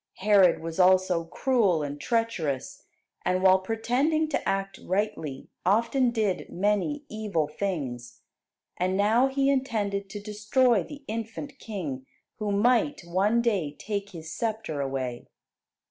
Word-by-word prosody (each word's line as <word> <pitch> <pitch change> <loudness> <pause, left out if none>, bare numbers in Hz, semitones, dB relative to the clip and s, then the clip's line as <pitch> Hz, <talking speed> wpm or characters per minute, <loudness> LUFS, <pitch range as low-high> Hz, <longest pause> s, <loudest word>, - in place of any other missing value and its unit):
Herod 190 -4 +4
was 165 +1 -5
also 185 -2 +4
cruel 200 - +1
and 145 0 -5
treacherous, 215 - -2 0.4
and 185 +1 0
while 190 0 +6
pretending 250 +10 0
to 310 - -1
act 195 0 -2
rightly, 175 -8 -2 0.2
often 235 +6 +3
did 215 -5 -1
many 210 - 0
evil 210 - -1
things. 145 -8 -4 0.6
And 185 +1 0
now 220 +6 +4
he 270 0 +1
intended 205 -7 -1
to 205 - -6
destroy 210 +2 +2
the 280 - -10
infant 230 +6 -5
King, 150 - -5 0.3
who 210 -1 -1
might 245 +8 +2
one 200 +7 +2
day 185 -11 0
take 200 -1 -4
his 165 -4 -9
sceptre 220 -10 -2
away. 130 -3 -3
200 Hz, 130 wpm, -27 LUFS, 175-230 Hz, 0.6 s, while